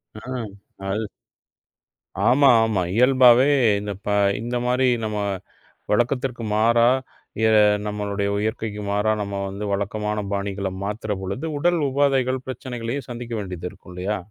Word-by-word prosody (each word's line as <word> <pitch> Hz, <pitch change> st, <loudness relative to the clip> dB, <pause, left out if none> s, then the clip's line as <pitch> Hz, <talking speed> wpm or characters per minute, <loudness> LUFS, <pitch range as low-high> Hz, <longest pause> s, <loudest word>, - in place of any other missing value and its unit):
ஆ, 110 Hz, -, -7 dB, 0.7 s
அது 105 Hz, +2 st, -2 dB, 1.2 s
ஆமா 135 Hz, +3 st, +5 dB, 0.2 s
ஆமா. 110 Hz, -4 st, 0 dB
இயல்பாவே 125 Hz, +1 st, +6 dB, 0.3 s
இந்த 105 Hz, 0 st, -5 dB
பா 105 Hz, -, 0 dB, 0.3 s
இந்த 120 Hz, +2 st, -3 dB
மாதிரி 125 Hz, +1 st, +2 dB, 0.2 s
நம்ம 110 Hz, -1 st, -2 dB, 0.7 s
வழக்கத்துக்கு 120 Hz, +2 st, 0 dB
மாறா 115 Hz, +2 st, +4 dB, 0.5 s
இதை 110 Hz, -1 st, +5 dB, 0.3 s
நம்மளுடைய 100 Hz, -1 st, -2 dB
இயற்கைக்கு 110 Hz, -2 st, -3 dB
மாறா, 105 Hz, +2 st, +1 dB
நம்ம 100 Hz, -1 st, -4 dB
வந்து 100 Hz, +2 st, -5 dB
வழக்கமான 105 Hz, +1 st, -2 dB
பாணிகளை 100 Hz, -1 st, -2 dB
மாத்துறபொழுது, 105 Hz, +3 st, -4 dB
உடல் 175 Hz, +3 st, +2 dB
உபாதைகள் 130 Hz, -2 st, +1 dB
பிரச்சனைகளையும் 125 Hz, 0 st, -5 dB
சந்திக்க 120 Hz, -1 st, -6 dB
வேண்டியது 90 Hz, -3 st, -5 dB
இருக்கும் -, -, -15 dB
இல்லையா? 95 Hz, +4 st, -2 dB
110 Hz, 115 wpm, -23 LUFS, 100-125 Hz, 1.2 s, இயல்பாவே